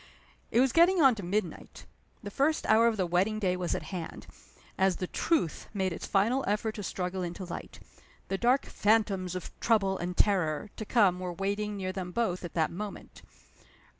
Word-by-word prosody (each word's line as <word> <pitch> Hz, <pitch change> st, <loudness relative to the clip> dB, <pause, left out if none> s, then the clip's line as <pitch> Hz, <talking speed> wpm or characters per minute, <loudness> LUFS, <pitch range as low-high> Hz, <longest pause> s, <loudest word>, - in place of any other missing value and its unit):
It 235 Hz, -, +2 dB
was 260 Hz, 0 st, +4 dB
getting 350 Hz, +2 st, +5 dB
on 270 Hz, -5 st, +7 dB
to 215 Hz, -, -6 dB
midnight. 200 Hz, +4 st, -4 dB, 0.4 s
The 205 Hz, -, -6 dB
first 295 Hz, +8 st, +1 dB
hour 225 Hz, +2 st, +5 dB
of 225 Hz, -2 st, +1 dB
the 185 Hz, -, +1 dB
wedding 185 Hz, +5 st, +1 dB
day 185 Hz, -4 st, 0 dB
was 180 Hz, -1 st, -2 dB
at -, -, -4 dB
hand, 170 Hz, -3 st, -6 dB, 0.5 s
as 190 Hz, -1 st, +2 dB
the 185 Hz, -, -3 dB
Truth 180 Hz, -, -1 dB
made 190 Hz, -2 st, 0 dB
its -, -, -6 dB
final 230 Hz, +7 st, +2 dB
effort 210 Hz, +2 st, 0 dB
to 210 Hz, -, -6 dB
struggle 185 Hz, 0 st, -3 dB
into 175 Hz, +2 st, -5 dB
light. 175 Hz, -, -8 dB, 0.5 s
The 195 Hz, -, -2 dB
dark 250 Hz, +3 st, +3 dB
Phantoms 205 Hz, -4 st, +1 dB
of 185 Hz, -, -6 dB
Trouble 195 Hz, -4 st, +2 dB
and 180 Hz, +1 st, -4 dB
Terror 185 Hz, -3 st, +1 dB
to 215 Hz, -, -6 dB
come 200 Hz, -6 st, +3 dB
were 180 Hz, -1 st, -4 dB
waiting 205 Hz, +3 st, -2 dB
near 185 Hz, -1 st, -3 dB
them 185 Hz, -2 st, -5 dB
both 185 Hz, -4 st, -1 dB
at 175 Hz, -, -7 dB
that 160 Hz, -2 st, +1 dB
moment. 205 Hz, +3 st, -8 dB
195 Hz, 190 wpm, -29 LUFS, 180-220 Hz, 0.5 s, on